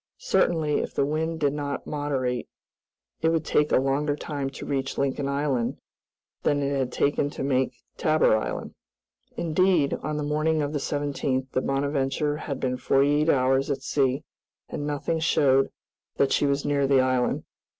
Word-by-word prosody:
Certainly, 165 Hz, -, +1 dB
if -, -, -4 dB
the 140 Hz, -, +2 dB
wind 160 Hz, +2 st, -1 dB
did 145 Hz, -2 st, +1 dB
not 145 Hz, -1 st, -4 dB
moderate, 135 Hz, -4 st, -2 dB, 0.7 s
it 160 Hz, -, +3 dB
would 165 Hz, -2 st, 0 dB
take 150 Hz, 0 st, +2 dB
a -, -, +5 dB
longer 140 Hz, +3 st, +1 dB
time 145 Hz, -2 st, -4 dB
to -, -, -8 dB
reach 135 Hz, -1 st, -2 dB
Lincoln 140 Hz, 0 st, 0 dB
Island 140 Hz, -4 st, 0 dB, 0.6 s
than 145 Hz, -1 st, +1 dB
it 140 Hz, 0 st, 0 dB
had 130 Hz, -2 st, -1 dB
taken 145 Hz, +1 st, +1 dB
to 145 Hz, -, -5 dB
make 130 Hz, -1 st, +1 dB, 0.2 s
Tabor 155 Hz, -7 st, +3 dB
Island. 110 Hz, -, -3 dB, 0.6 s
Indeed, 170 Hz, -2 st, +2 dB
on 150 Hz, 0 st, -3 dB
the 150 Hz, -, -2 dB
morning 155 Hz, +1 st, +1 dB
of 145 Hz, +1 st, -3 dB
the 145 Hz, -, 0 dB
17th, 140 Hz, -2 st, -2 dB
the 130 Hz, -, 0 dB
"Bonadventure" 140 Hz, +2 st, 0 dB
had 140 Hz, -2 st, -5 dB
been 125 Hz, -1 st, -1 dB
forty 140 Hz, +3 st, +3 dB
eight 155 Hz, -, +1 dB
hours 135 Hz, 0 st, +3 dB
at 140 Hz, -, -2 dB
sea, 135 Hz, 0 st, +1 dB, 0.4 s
and 145 Hz, -, -4 dB
nothing 150 Hz, +3 st, -1 dB
showed 135 Hz, -4 st, +3 dB, 0.5 s
that 140 Hz, -, +2 dB
she 145 Hz, -, +3 dB
was 140 Hz, 0 st, 0 dB
near 140 Hz, -1 st, +2 dB
the 135 Hz, -1 st, +4 dB
island. 130 Hz, -1 st, +1 dB
140 Hz, 170 wpm, -26 LUFS, 135-150 Hz, 0.7 s, a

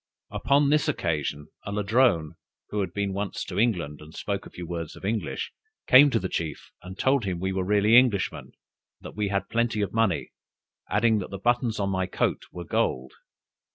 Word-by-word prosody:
Upon 140 Hz, +1 st, +2 dB
this 150 Hz, 0 st, +3 dB
occasion, 75 Hz, -, -2 dB
a 100 Hz, -, -5 dB
Ladrone, 105 Hz, -5 st, +2 dB, 0.4 s
who 105 Hz, -, -2 dB
had 95 Hz, -4 st, -1 dB
been 100 Hz, 0 st, -2 dB
once 100 Hz, 0 st, -3 dB
to -, -, -4 dB
England 90 Hz, -11 st, 0 dB
and 75 Hz, +1 st, -13 dB
spoke 100 Hz, -1 st, -3 dB
a -, -, -13 dB
few 90 Hz, -, -8 dB
words 85 Hz, -2 st, -5 dB
of -, -, -10 dB
English, 110 Hz, +2 st, -2 dB, 0.3 s
came 140 Hz, +3 st, +8 dB
to 120 Hz, -, +1 dB
the 95 Hz, -, -2 dB
chief, 80 Hz, -5 st, -4 dB
and 95 Hz, +1 st, -10 dB
told 135 Hz, +1 st, +2 dB
him 90 Hz, -3 st, -2 dB
we 95 Hz, +2 st, -1 dB
were 95 Hz, 0 st, -1 dB
really 105 Hz, +3 st, +3 dB
Englishmen, 120 Hz, -7 st, +3 dB
and -, -, -21 dB, 0.5 s
that -, -, -10 dB
we 105 Hz, -1 st, -1 dB
had 100 Hz, 0 st, -1 dB
plenty 115 Hz, -2 st, 0 dB
of 100 Hz, -, -2 dB
money, 115 Hz, -6 st, +1 dB, 0.6 s
adding 110 Hz, 0 st, +3 dB
that 95 Hz, -, -6 dB
the 100 Hz, -, -6 dB
buttons 120 Hz, +1 st, 0 dB
on 100 Hz, -1 st, 0 dB
my 95 Hz, -1 st, 0 dB
coat -, -, -1 dB
were 90 Hz, -1 st, -7 dB
gold. 65 Hz, -4 st, -1 dB
100 Hz, 195 wpm, -26 LUFS, 90-115 Hz, 0.6 s, came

